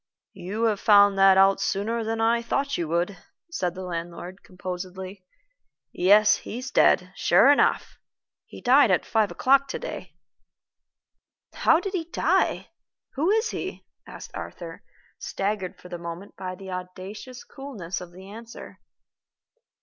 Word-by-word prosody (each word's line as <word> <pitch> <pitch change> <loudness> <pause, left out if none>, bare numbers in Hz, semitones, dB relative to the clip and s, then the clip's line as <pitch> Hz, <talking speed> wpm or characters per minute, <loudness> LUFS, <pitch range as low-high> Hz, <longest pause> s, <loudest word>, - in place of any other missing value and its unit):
"You 205 +6 -5
have 215 -3 +1
found 205 -1 +6
that 195 0 +6
out 195 0 +5
sooner 215 +4 -1
than 225 +1 -3
I 230 +1 +2
thought 275 +4 -1
you 170 - -2
would," 175 +5 -1 0.3
said 180 - -2
the 185 - -6
landlord, 175 +1 -6
composedly. 185 +1 -7 0.7
"Yes, 210 +4 +5
he's 255 +3 -7
dead, 180 +1 +3
sure 200 +11 +5
enough. 290 - +1 0.5
He - - -12
died 255 0 +5
at 185 - +2
five 220 -3 +1
o'clock 275 +1 +3
to - - -4
day." - - -8 1.4
"How 320 - +3
did 390 +2 -5
he 345 -4 -2
die? 345 - 0 0.4
Who 305 +6 0
is 440 +3 +1
he?" - - -6 0.2
asked - - -10
Arthur, - - -8 0.4
staggered 195 -2 -3
for - - -13
the 175 -1 -6
moment 170 +3 -8
by 185 -1 -6
the 190 0 -10
audacious 185 +7 -8
coolness 220 -12 -7
of 180 -1 -10
the 185 +2 -13
answer. 230 +3 -11
195 Hz, 140 wpm, -25 LUFS, 185-235 Hz, 1.4 s, found